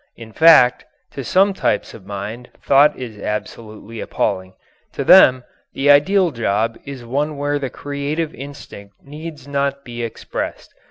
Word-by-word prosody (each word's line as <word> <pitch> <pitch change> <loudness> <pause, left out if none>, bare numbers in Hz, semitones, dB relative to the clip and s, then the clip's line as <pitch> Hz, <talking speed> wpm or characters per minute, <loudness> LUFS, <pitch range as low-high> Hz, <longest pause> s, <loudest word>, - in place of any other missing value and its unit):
In 115 -1 -12
fact, 155 -7 +6 0.3
to 135 - -6
some 195 +7 +3
types - - -1
of 95 -3 -14
mind 105 +5 -7
thought 140 +2 +4
is 115 -5 -8
absolutely 110 +1 -6
appalling. 95 0 -3 0.4
To - - -3
them 130 -1 +6 0.3
the 145 +1 +3
ideal 180 +5 +4
job 115 -2 -1
is 135 -3 -8
one 145 +5 -2
where 145 0 -1
the 135 -2 -4
creative 145 +4 -4
instinct 115 -8 -11
need 150 -1 -10
not 140 0 -2
be 120 -1 -7
expressed. 115 -1 -6
135 Hz, 145 wpm, -19 LUFS, 115-145 Hz, 0.4 s, fact